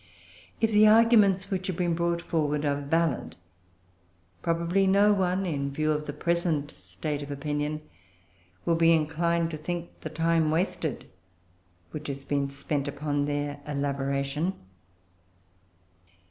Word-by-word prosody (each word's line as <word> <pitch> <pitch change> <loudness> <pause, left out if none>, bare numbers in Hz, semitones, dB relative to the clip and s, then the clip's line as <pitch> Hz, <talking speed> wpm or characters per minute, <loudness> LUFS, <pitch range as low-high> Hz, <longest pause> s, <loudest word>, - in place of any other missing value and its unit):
If 225 0 +2
the 215 0 +6
arguments 215 -4 +5
which 185 -1 -2
have 185 -3 -3
been 175 -2 +1
brought 170 0 0
forward 150 -2 0
are 145 0 0
valid, 160 0 0 1.1
probably 170 +3 +1
no 200 +2 +5
one, 190 -1 0
in 140 -5 -2
view 155 +2 0
of 150 0 -2
the - - -2
present 170 -4 0
state 95 - -5
of 145 - -7
opinion, 145 +1 -2 0.8
will 170 - +3
be 165 0 +5
inclined 165 +2 +1
to 155 - -4
think 170 +2 -5
the - - -5
time 165 0 +1
wasted 165 +5 -1 0.9
which 155 0 -6
has 140 -1 -5
been 140 -1 0
spent 140 +1 -3
upon 145 0 -1
their 145 0 -2
elaboration. 140 +3 -1
155 Hz, 130 wpm, -27 LUFS, 145-175 Hz, 1.1 s, the